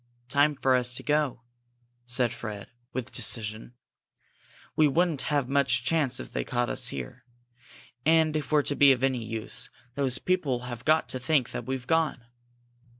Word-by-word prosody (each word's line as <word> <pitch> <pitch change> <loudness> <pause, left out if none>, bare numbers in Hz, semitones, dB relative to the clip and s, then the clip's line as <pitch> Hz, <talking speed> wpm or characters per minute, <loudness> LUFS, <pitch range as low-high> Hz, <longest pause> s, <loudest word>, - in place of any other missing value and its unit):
"Time 145 +2 +3
for 130 -1 +2
us 125 -1 +1
to - - -4
go," 145 -5 0 0.6
said 125 -1 +1
Fred, 105 -3 -7 0.2
with 130 -3 -5
decision. 110 +1 0 1.0
"We 155 - +5
wouldn't 165 0 +1
have 145 -4 +1
much 130 -3 +2
chance 140 -3 +1
if - - -9
they - - -1
caught 120 -1 -1
us - - +1
here. 65 -3 -4 0.8
And 160 0 +3
if 155 -1 -3
we're 150 -1 +4
to 145 - -2
be 140 -1 +7
of 130 0 -4
any 130 -3 +1
use, 110 0 -4 0.2
those 130 -2 0
people 150 -10 0
have 120 -2 -7
got 155 +1 +3
to 130 - -2
think 135 -2 +1
that - - -6
we've 130 -1 -3
gone." 160 -6 0
130 Hz, 165 wpm, -27 LUFS, 120-150 Hz, 1.0 s, be